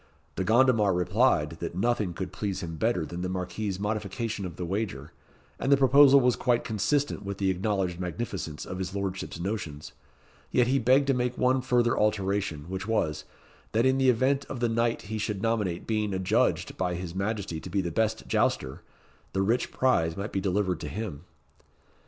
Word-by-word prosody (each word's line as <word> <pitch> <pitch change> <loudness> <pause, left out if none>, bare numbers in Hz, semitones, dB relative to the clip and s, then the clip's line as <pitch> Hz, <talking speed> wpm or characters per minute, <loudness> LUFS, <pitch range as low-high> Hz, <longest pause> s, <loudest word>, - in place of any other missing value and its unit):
De 95 - -1
Gondomar 110 -3 +4
replied, 90 -1 +2
that - - -5
nothing 105 -1 0
could 90 +2 -6
please 100 -2 -3
him 80 -1 -5
better 100 -3 0
than 85 +3 -6
the 90 - -2
Marquis's 95 +2 -3
modification 105 0 -3
of 85 - -9
the 90 - -4
wager, 90 -7 -3 0.5
and 135 - 0
the 140 - +7
proposal 140 +1 +7
was 125 -2 +3
quite 120 -2 +1
consistent 135 +7 0
with 100 0 -5
the 95 -1 +1
acknowledged 95 -2 -1
magnificence 90 -4 -4
of 95 - -6
his 95 +1 -4
Lordship's 95 -3 -4
notions; 85 -6 -4 0.6
yet 125 - +3
he 135 +3 +2
begged 130 +4 +4
to 135 - +2
make 125 -1 -1
one 130 +1 +2
further 120 -2 +2
alteration, 100 -6 0
which 95 +2 -5
was, 85 -9 0 0.5
that 115 +3 +3
in 130 +1 +3
the 130 -1 +4
event 130 +4 +2
of 130 - -6
the 120 - +2
knight 115 +1 0
he 110 +2 -4
should 105 -1 -2
nominate 105 -7 -1
being 105 -3 -1
adjudged 95 -1 +1
by 90 -1 -1
his 85 -1 -5
Majesty 100 -3 -2
to 90 - -9
be 100 +3 0
the 85 -2 -3
best 110 +5 -1
jouster, 65 - 0 0.5
the 95 - +1
rich 115 +5 +1
prize 85 -11 +1
might 100 +1 -4
be 95 - -1
delivered 95 -1 0
to - - -5
him. 95 -7 -5
100 Hz, 185 wpm, -28 LUFS, 90-120 Hz, 0.6 s, the